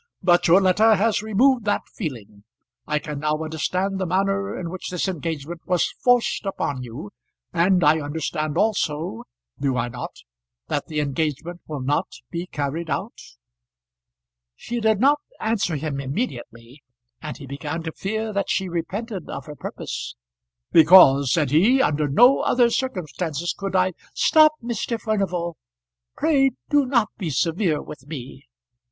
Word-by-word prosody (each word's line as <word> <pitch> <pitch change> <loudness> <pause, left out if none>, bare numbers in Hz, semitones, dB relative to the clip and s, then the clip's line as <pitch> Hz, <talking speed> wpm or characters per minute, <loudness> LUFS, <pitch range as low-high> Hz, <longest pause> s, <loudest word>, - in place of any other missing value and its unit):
But 175 -1 +4
your 175 +3 +7
letter 215 +4 +5
has 210 +2 +1
removed 235 +4 +3
that 205 - 0
feeling. 115 - -7 0.4
I 150 - +1
can 150 -1 -5
now 150 +1 0
understand 185 +5 -2
the 190 - -1
manner 195 +2 0
in 170 -2 -5
which 185 - -6
this 180 +1 -2
engagement 165 -2 -4
was 180 -2 +1
forced 245 -1 +3
upon 145 -9 -3
you; 125 - -8 0.4
and 180 +1 +3
I 150 +2 +5
understand 155 +1 -3
also 160 - -1 0.3
do 135 -2 0
I 120 0 -1
not? 120 +1 -8 0.5
that - - -2
the 155 -1 -1
engagement 155 +4 -3
will 150 -3 -5
not 140 +3 0 0.2
be 170 +1 -4
carried 155 +2 -3
out?" - - -2 1.4
She 240 - -4
did 220 -2 +2
not 285 +4 +4 0.2
answer 205 -6 0
him 145 -1 -3
immediately, 130 - -5 0.4
and 155 -1 -6
he 140 - -10
began 145 +4 -5
to 165 - -4
fear 220 +5 -3
that 200 -1 -1
she 190 - 0
repented 185 +3 -4
of - - -6
her 150 - -9
purpose. - - -6 0.6
"Because," 150 -6 +7
said 150 -3 +1
he, 210 - +4
"under 150 - +2
no 245 - +5
other 240 -1 +3
circumstances 175 - -2
could 195 -1 -4
I 185 0 +2
" - - -27
"Stop, 310 -1 +5
Mr. 235 0 -2
Furnival. 185 -7 -2 0.6
Pray 280 -4 +3 0.2
do 290 -2 +3
not 235 -5 +2
be 180 -6 -2
severe 165 +2 0
with 140 -2 -11
me." 135 - -9
170 Hz, 150 wpm, -23 LUFS, 150-205 Hz, 1.4 s, your